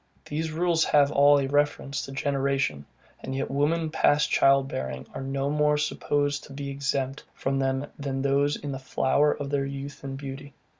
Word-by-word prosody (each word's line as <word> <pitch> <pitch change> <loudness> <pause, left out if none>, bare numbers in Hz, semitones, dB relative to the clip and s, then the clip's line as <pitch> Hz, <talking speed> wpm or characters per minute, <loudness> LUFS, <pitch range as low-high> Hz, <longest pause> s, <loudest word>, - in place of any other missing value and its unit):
These 160 +2 -3
rules 165 0 +2
have 145 -1 +4
all 145 0 +6
a 140 - +1
reference 145 0 0
to - - -9
generation; 135 - -1 0.3
and 130 - -5
yet 135 - -2
women 155 +3 +1
past 150 -2 +3
child 135 0 +4
bearing 65 - -5
are - - -5
no 135 +1 -2
more 150 0 +2
supposed 145 -1 0
to 140 - -12
be 140 0 -5
exempted 135 0 -2
from 135 0 -1
them 135 +1 0
than 135 -1 -3
those 140 +1 +2
in 145 - -6
the 135 - -4
flower 140 +2 +2
of 145 -1 -4
their 140 -1 +1
youth 140 +1 -7
and 135 -1 -5
beauty. 135 0 -8
140 Hz, 185 wpm, -26 LUFS, 135-145 Hz, 0.3 s, all